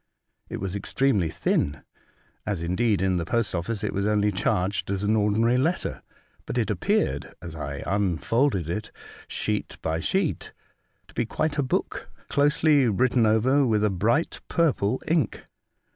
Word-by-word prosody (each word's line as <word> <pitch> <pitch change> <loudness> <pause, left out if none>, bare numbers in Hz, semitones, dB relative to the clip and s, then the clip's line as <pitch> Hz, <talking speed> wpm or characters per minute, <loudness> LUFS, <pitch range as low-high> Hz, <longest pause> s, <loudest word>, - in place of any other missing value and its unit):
It - - -4
was 95 0 -4
extremely 100 -3 +1
thin, 70 -2 -1 0.6
as, 100 -5 -3
indeed, 100 +3 +1
in 95 -1 +2
the 85 - -1
Post 115 +5 -1
office 95 +5 -3
it - - -1
was 100 +1 0
only 105 -1 +2
charged 95 0 0
as 100 0 -1
an 105 +2 +2
ordinary 110 +3 +2
letter; 160 +8 -1 0.5
but - - -3
it - - +1
appeared, - - 0
as 85 0 -8
I 75 - -5
unfolded 100 - +1
it, 95 +6 -3 0.4
sheet - - -3
by 80 0 -1
sheet, 180 - -1 0.5
to - - -19
be - - -1
quite 150 -1 -1
a - - +5
book, 130 - -2 0.2
closely 145 -1 +3
written 120 +2 +3
over 125 +6 +3
with 110 -4 +2
a 105 - +2
bright 115 - 0
purple 130 - +1
ink. 160 -7 0
105 Hz, 155 wpm, -25 LUFS, 95-130 Hz, 0.6 s, a